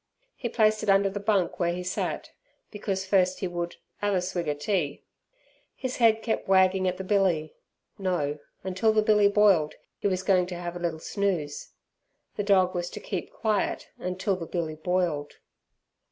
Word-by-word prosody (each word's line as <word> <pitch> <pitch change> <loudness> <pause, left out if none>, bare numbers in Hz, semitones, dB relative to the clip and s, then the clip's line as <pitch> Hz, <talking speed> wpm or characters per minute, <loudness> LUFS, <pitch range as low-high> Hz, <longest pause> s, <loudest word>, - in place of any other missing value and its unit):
He 240 - -4
placed 215 -2 +3
it - - -2
under 195 0 +4
the 205 - -4
bunk 200 -4 +1
where 170 -1 +1
he 180 +1 -4
sat, 180 - -3 0.4
because 195 -2 -3
first 185 -1 +2
he 190 - -1
would 175 -1 -4 0.3
"'ave 205 -2 +2
a - - +1
swig 180 -2 -3
er 150 - 0
tea". 150 -1 -1 0.7
His 255 -2 -4
head 225 -2 +4
kept 225 - -1
wagging 190 0 +4
at 180 0 -1
the 190 - -5
billy. 185 -6 +1 0.5
No, 150 -6 -1 0.2
until 190 +4 +1
the 215 0 +3
billy 210 -1 +5
boiled 200 -7 +4 0.2
he - - 0
was 185 -1 -1
going 185 -2 +3
to 180 - -5
have 175 0 -5
a - - -5
little 170 -2 -2
snooze. 175 -6 -2 0.6
The - - -1
dog 190 -3 +3
was 175 -1 -2
to - - -7
keep 185 -4 -5
quiet 215 -3 -1
until 185 +2 -1
the 170 -3 -6
billy 165 -3 -2
boiled. 160 -3 -1
185 Hz, 180 wpm, -27 LUFS, 175-200 Hz, 0.7 s, billy